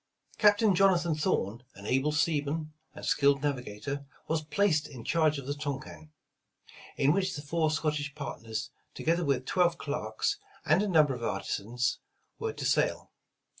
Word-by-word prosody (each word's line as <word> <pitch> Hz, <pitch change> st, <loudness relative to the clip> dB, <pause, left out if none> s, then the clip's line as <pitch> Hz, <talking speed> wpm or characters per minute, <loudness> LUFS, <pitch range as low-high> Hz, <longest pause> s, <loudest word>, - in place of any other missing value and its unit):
Captain 210 Hz, -1 st, +5 dB
Jonathan 175 Hz, -3 st, +4 dB
Thorn, 125 Hz, -, 0 dB
an 100 Hz, -, -11 dB
able 135 Hz, +6 st, +2 dB
seaman 155 Hz, 0 st, 0 dB, 0.2 s
and -, -, -7 dB
skilled 140 Hz, -1 st, +3 dB
navigator, 140 Hz, 0 st, -3 dB, 0.2 s
was 160 Hz, 0 st, 0 dB
placed 155 Hz, -2 st, +1 dB
in 125 Hz, -5 st, -10 dB
charge 155 Hz, 0 st, +2 dB
of 140 Hz, -, -6 dB
the 140 Hz, -, -1 dB
Tonquin, 145 Hz, +1 st, -6 dB, 0.9 s
in 140 Hz, +2 st, +4 dB
which 190 Hz, 0 st, 0 dB
the 145 Hz, -, -6 dB
four 155 Hz, +1 st, +1 dB
Scottish 150 Hz, -2 st, -1 dB
partners, 115 Hz, -6 st, -5 dB, 0.2 s
together 170 Hz, +2 st, +1 dB
with 135 Hz, -4 st, 0 dB
twelve 175 Hz, 0 st, +2 dB
clerks, 140 Hz, -9 st, -2 dB, 0.3 s
and 155 Hz, +6 st, +4 dB
a 210 Hz, -, 0 dB
number 155 Hz, -7 st, +4 dB
of 125 Hz, -, -6 dB
artisans, 115 Hz, +4 st, -1 dB, 0.4 s
were 450 Hz, -1 st, -1 dB
to -, -, -6 dB
sail. -, -, +1 dB
150 Hz, 150 wpm, -30 LUFS, 135-165 Hz, 0.9 s, Captain